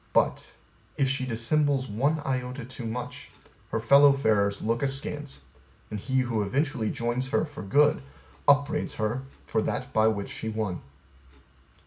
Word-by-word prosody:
But, - - +1 0.4
an 140 - +3
she 130 -1 -1
dissembles 135 +3 +1
one 140 +9 0
iota 125 -1 -3
too 125 -2 -7
much, 120 +2 -6 0.4
her - - -1
fellow 140 +5 +7
farers 105 -6 +1
look 115 +2 0
askance, 140 - -2 0.5
and 105 - -3
he 130 +5 +1
who 120 -4 -1
eventually 130 +2 0
joins 120 +3 -2
her 145 - +1
for 145 -2 -9
good 145 +10 +3 0.5
upbraids 145 +1 +3
her 110 +4 -1 0.2
for - - 0
that - - -3
by 110 0 +4
which 100 -3 -1
she 110 - -4
won. 110 -4 -3
125 Hz, 145 wpm, -27 LUFS, 110-140 Hz, 0.5 s, fellow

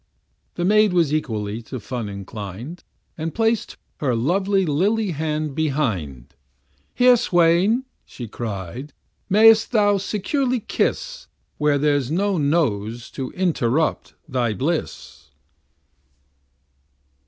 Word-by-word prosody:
The 175 - -1
maid 210 0 +4
was 165 -5 +2
equally 110 -7 -2
to 125 +3 -7
fun 115 -1 -5
inclin'd, 100 - -8 0.4
And 160 +1 -4
plac'd 225 -1 0 0.2
her 130 -5 0
lovely 190 - +1
lily 195 +7 +1
hand 155 -1 -2
behind; 105 - -2 0.6
Here, 250 0 +6
swain, 180 +5 +3 0.2
she 120 - -9
cry'd, 110 - -6 0.4
may'st 220 +2 +6
thou 205 -2 +3
securely 250 +6 -1
kiss, - - -2 0.3
Where 150 -1 +3
there's 145 -3 +1
no 190 +3 0
nose 120 -7 0
to 130 -1 -5
interrupt 160 -5 0
thy 125 -6 -1
bliss. 155 +4 -4
155 Hz, 105 wpm, -22 LUFS, 120-195 Hz, 0.6 s, Here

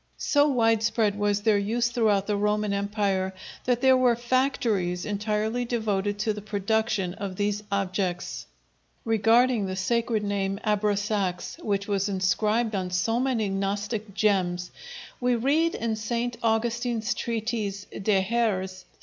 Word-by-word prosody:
So 290 0 +3
widespread 225 -4 +2
was 205 0 +1
their 215 -2 +4
use 235 +4 0
throughout 215 -5 +2
the 210 - 0
Roman 210 0 0
Empire, 200 -2 -1 0.3
that 245 -1 +1
there 265 -1 +6
were 250 -2 +4
factories 235 -8 0
entirely 210 +3 -1
devoted 210 -4 -1
to 215 +1 0
the 210 - -7
production 210 -2 -1
of 195 -1 -5
these 205 +1 -1
objects. 185 -2 -2 0.6
Regarding 225 0 +3
the 185 - -3
sacred 225 +3 0
name 200 -1 -1
Abrasax, 205 -3 -1
which 200 -1 -1
was 200 0 0
inscribed 210 +4 +1
on 185 -2 -2
so 180 +6 0
many 250 -5 0
Gnostic 200 +2 -3
gems, 180 -4 +1 0.5
we 245 -1 +2
read 295 +8 +2
in 225 -1 -1
St. 235 +2 -2
Augustine's 230 0 0
treatise 220 -3 -3
De 195 -1 +1
hæres. 190 -4 -1
210 Hz, 130 wpm, -26 LUFS, 200-230 Hz, 0.6 s, there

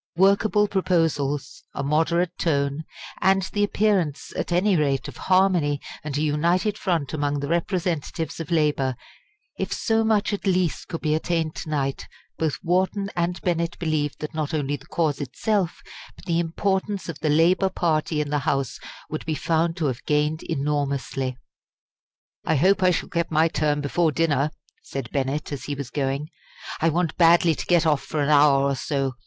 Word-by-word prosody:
Workable 200 +3 +4
proposals 155 -7 0
a - - -2
moderate 165 +4 +1
tone 140 -1 0 0.4
and 190 0 +3
the 205 - +1
appearance, 200 -8 0
at - - -3
any 185 +3 +3
rate, 140 -4 +1
of - - -9
harmony 185 -6 +2 0.2
and 145 -2 -3
a 150 - 0
united 170 +7 +1
front 170 -9 -1
among 145 -1 -1
the 140 - -3
representatives 170 -2 -2
of 165 - -5
labour 150 -6 +1 0.6
if - - -2
so 225 -1 +1
much 220 -1 +2
at 200 - -3
least 185 -3 +1
could 165 - -5
be 155 -1 +1
attained 160 0 0
to - - -6
night, 135 -3 -2 0.3
both 155 -6 0
Wharton 190 +3 0
and 175 +1 -1
Bennett 170 -1 -1
believed 155 -3 -1
that 150 - -5
not 155 0 -2
only 145 -1 -1
the 145 +2 -13
cause 155 -4 0
itself, 180 - -1 0.3
but - - -16
the 170 -2 +1
importance 190 +4 -1
of 165 -4 -6
the 155 - 0
Labour 175 +5 +4
party 155 -3 0
in 145 -1 -4
the 150 - +1
House 140 -3 -1 0.3
would 155 - -5
be 155 - 0
found 165 +2 0
to 165 - -1
have 130 -3 -2
gained 150 +2 +1
enormously. 140 -3 -2 1.1
"I 160 - +1
hope 190 +8 +3
I 185 - +5
shall 180 - 0
get 170 -1 -1
my 160 +1 +3
turn 150 -2 0
before 160 +3 +1
dinner," 150 -2 +1 0.3
said 135 -4 -6
Bennett, 140 +2 -2
as 140 - -5
he 145 - -3
was 140 -3 -6
going; 140 +2 -2 0.5
"I 165 - +4
want 170 0 -1
badly 170 0 +5
to - - -5
get 175 -2 +4
off 150 -3 +2
for 155 - -4
an 145 0 +1
hour 145 -2 +5
or 140 0 +1
so. 135 0 -1
160 Hz, 175 wpm, -24 LUFS, 145-175 Hz, 1.1 s, I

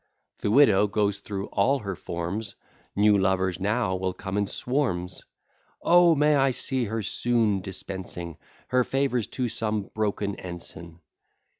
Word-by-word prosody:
The - - -1
widow 105 -4 +5
goes 100 -1 0
through 100 -1 -5
all 135 +8 +2
her 100 -6 -5
forms: 90 +6 -5 0.4
New 105 0 +4
lovers 95 -1 +1
now 100 -1 0
will 95 0 -2
come 95 0 -5
in 100 -1 +1
swarms. 105 -9 -2 0.6
O, 175 -1 +6
may 150 +1 +4
I 135 -1 +4
see 130 0 -1
her 110 +1 -3
soon 110 -2 +1
dispensing 90 -3 -6 0.3
Her 125 0 +3
favours 130 -3 0
to 125 -2 -2
some 110 -3 -2
broken 105 -2 -1
ensign! 85 -1 -7
105 Hz, 140 wpm, -26 LUFS, 95-120 Hz, 0.6 s, O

